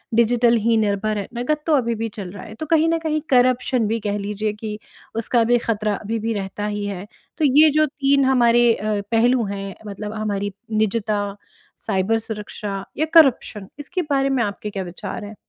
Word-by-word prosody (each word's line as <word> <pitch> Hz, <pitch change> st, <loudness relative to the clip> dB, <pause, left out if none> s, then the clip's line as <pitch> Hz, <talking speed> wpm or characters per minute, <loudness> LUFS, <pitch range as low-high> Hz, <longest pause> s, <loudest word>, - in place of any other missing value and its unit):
Digital 235 Hz, +1 st, +4 dB
ही 225 Hz, +1 st, +2 dB
निर्भर 215 Hz, 0 st, 0 dB
हैं। 200 Hz, -, -4 dB
नकद 300 Hz, +6 st, 0 dB
तो 315 Hz, -, +3 dB
अभी 235 Hz, -4 st, +1 dB
भी 225 Hz, +1 st, -2 dB
चल 200 Hz, -3 st, -7 dB
रहा 200 Hz, -, -9 dB
है। 215 Hz, -, -10 dB
तो 310 Hz, -, -5 dB
कहीं 320 Hz, +1 st, +3 dB
न 330 Hz, -, +2 dB
कहीं 310 Hz, -1 st, -1 dB
करप्शन 250 Hz, -2 st, +3 dB
भी 225 Hz, +1 st, -1 dB
कह 205 Hz, 0 st, -2 dB
लीजिए 210 Hz, +1 st, -2 dB
कि 210 Hz, 0 st, -6 dB, 0.4 s
उसका 230 Hz, +1 st, +2 dB
भी 240 Hz, +1 st, +3 dB
ख़तरा 215 Hz, -3 st, -1 dB
अभी 225 Hz, +2 st, -3 dB
भी 225 Hz, +1 st, -1 dB
रहता 200 Hz, 0 st, -4 dB
ही 205 Hz, -1 st, -3 dB
है। 200 Hz, -1 st, -5 dB, 0.3 s
तो 310 Hz, -, +2 dB
ये 300 Hz, +3 st, +6 dB
जो 310 Hz, +1 st, +3 dB
3 275 Hz, -1 st, +2 dB
हमारे 240 Hz, -2 st, +4 dB
अ, 210 Hz, -1 st, -2 dB
पहलू 235 Hz, +1 st, +3 dB
हैं 195 Hz, -1 st, -5 dB
मतलब 210 Hz, +1 st, -6 dB
हमारी 205 Hz, -2 st, -2 dB, 0.2 s
निजता 210 Hz, -1 st, 0 dB, 0.5 s
साइबर 195 Hz, +4 st, +1 dB
सुरक्षा 210 Hz, -2 st, -5 dB
या 310 Hz, -, +2 dB
करप्शन 260 Hz, -, +4 dB
इसके 295 Hz, +5 st, -3 dB
बारे 275 Hz, -1 st, +2 dB
में 260 Hz, -3 st, +1 dB
आपके 205 Hz, 0 st, -4 dB
क्या 195 Hz, -2 st, -4 dB
विचार 185 Hz, +4 st, -6 dB
हैं? 210 Hz, +1 st, -9 dB
220 Hz, 195 wpm, -21 LUFS, 205-250 Hz, 0.5 s, ये